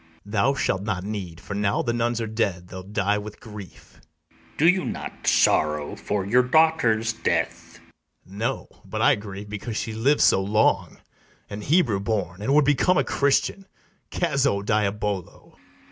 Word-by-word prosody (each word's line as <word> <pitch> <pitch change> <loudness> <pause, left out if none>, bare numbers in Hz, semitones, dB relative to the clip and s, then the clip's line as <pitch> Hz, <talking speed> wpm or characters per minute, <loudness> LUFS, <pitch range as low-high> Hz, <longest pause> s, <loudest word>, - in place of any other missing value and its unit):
Thou 110 +6 +1
shalt 95 -8 0
not 100 -3 -3
need; 95 -5 -5
for, 100 - -7
now 100 0 0
the 120 - -1
nuns 120 0 0
are 115 - -2
dead, 100 -5 -2
They'll 95 - -7
die 100 +1 -1
with 105 0 -9
grief. 105 -4 -12 0.3
ITHAMORE. - - -29
Do 160 - +4
you 180 +1 +4
not - - -6
sorrow 75 -1 +2
for 100 -2 -3
your 120 +6 +4
daughter's 125 -5 +2
death? 115 - -2
BARABAS. 100 +2 -18
No, 120 +4 -2 0.2
but - - -3
I - - +6
grieve 100 0 -7
because 105 +2 -5
she 110 - -3
liv'd 135 +7 +2
so 95 - +5
long, 100 -3 +1 0.5
An 100 +1 -5
Hebrew 140 - +2
born, 100 -3 -3
and 135 +7 +1
would 150 -1 +5
become 145 +6 +3
a - - +3
Christian: 140 +7 0 0.4
Cazzo, 140 - 0
diabolo! 105 -3 -2
ITHAMORE. - - -27
105 Hz, 165 wpm, -24 LUFS, 100-120 Hz, 0.5 s, I